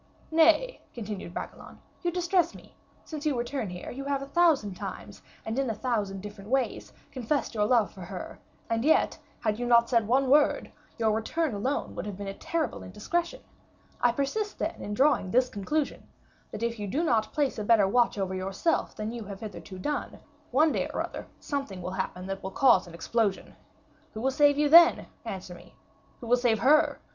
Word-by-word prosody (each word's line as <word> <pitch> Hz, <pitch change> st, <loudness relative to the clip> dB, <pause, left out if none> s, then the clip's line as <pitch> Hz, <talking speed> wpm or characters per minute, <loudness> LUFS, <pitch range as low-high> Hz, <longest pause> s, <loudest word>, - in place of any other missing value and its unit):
"Nay," 330 Hz, +10 st, +4 dB
continued 210 Hz, -6 st, -6 dB
Bragelonne, -, -, -7 dB, 0.2 s
"you 350 Hz, -, 0 dB
distress 350 Hz, 0 st, +1 dB
me; -, -, -15 dB, 0.3 s
since 305 Hz, -2 st, -6 dB
your 300 Hz, -3 st, +1 dB
return 240 Hz, -2 st, -2 dB
here, 180 Hz, 0 st, -7 dB
you 275 Hz, +2 st, -6 dB
have 280 Hz, -1 st, -1 dB
a 275 Hz, -, -10 dB
thousand 310 Hz, -, +3 dB
times, 185 Hz, -, -8 dB, 0.2 s
and 225 Hz, +4 st, -2 dB
in 270 Hz, -3 st, 0 dB
a 225 Hz, -, -2 dB
thousand 205 Hz, -5 st, -2 dB
different 205 Hz, 0 st, -9 dB
ways, 265 Hz, 0 st, -1 dB, 0.2 s
confessed 260 Hz, +2 st, -1 dB
your 210 Hz, -2 st, +1 dB
love 230 Hz, -2 st, +3 dB
for 190 Hz, -, -12 dB
her; 180 Hz, +1 st, -7 dB, 0.3 s
and 230 Hz, 0 st, 0 dB
yet, 315 Hz, +3 st, +3 dB, 0.2 s
had 215 Hz, +1 st, 0 dB
you 245 Hz, -, -2 dB
not 235 Hz, 0 st, +5 dB
said 230 Hz, -3 st, +3 dB
one 265 Hz, +3 st, +3 dB
word, 290 Hz, +3 st, +3 dB, 0.3 s
your 225 Hz, -2 st, +2 dB
return 250 Hz, +7 st, -1 dB
alone 255 Hz, +8 st, -2 dB
would 180 Hz, -, -5 dB
have 200 Hz, -3 st, -6 dB
been 200 Hz, -, -6 dB
a -, -, -4 dB
terrible 315 Hz, +1 st, -3 dB
indiscretion. 340 Hz, -, -3 dB, 0.6 s
I 245 Hz, -, +5 dB
persist, 285 Hz, -, -2 dB
then, -, -, -3 dB
in 205 Hz, -, -4 dB
drawing 270 Hz, -6 st, +3 dB
this 250 Hz, +4 st, +3 dB
conclusion; 280 Hz, +9 st, -2 dB, 0.4 s
that 220 Hz, -, -5 dB
if 235 Hz, -1 st, -2 dB
you 205 Hz, -, -3 dB
do 285 Hz, -, 0 dB
not 225 Hz, -9 st, +1 dB
place 285 Hz, -6 st, 0 dB
a -, -, -2 dB
better 205 Hz, -2 st, +4 dB
watch 235 Hz, +2 st, +2 dB
over 190 Hz, -1 st, -2 dB
yourself 195 Hz, -, -1 dB
than 215 Hz, +1 st, -4 dB
you 235 Hz, -2 st, -6 dB
have 200 Hz, +1 st, -8 dB
hitherto 205 Hz, -3 st, -8 dB
done, 285 Hz, +7 st, -3 dB, 0.3 s
one 300 Hz, +5 st, +4 dB
day -, -, -1 dB
or -, -, -1 dB
other -, -, -7 dB
something 275 Hz, -10 st, -4 dB
will 180 Hz, +1 st, -5 dB
happen 190 Hz, -1 st, -4 dB
that 195 Hz, 0 st, -4 dB
will 190 Hz, -, -4 dB
cause 210 Hz, -3 st, +4 dB
an 170 Hz, -, -11 dB
explosion. 205 Hz, +3 st, -1 dB, 0.6 s
Who 220 Hz, -, -4 dB
will 265 Hz, +2 st, +1 dB
save 285 Hz, +1 st, +4 dB
you 295 Hz, 0 st, +3 dB
then? 335 Hz, +3 st, +7 dB, 0.2 s
Answer 190 Hz, -4 st, -6 dB
me. 175 Hz, 0 st, -15 dB, 0.5 s
Who -, -, -7 dB
will 245 Hz, +2 st, +4 dB
save 240 Hz, -3 st, +2 dB
her? 290 Hz, +8 st, +4 dB
235 Hz, 195 wpm, -28 LUFS, 205-285 Hz, 0.6 s, then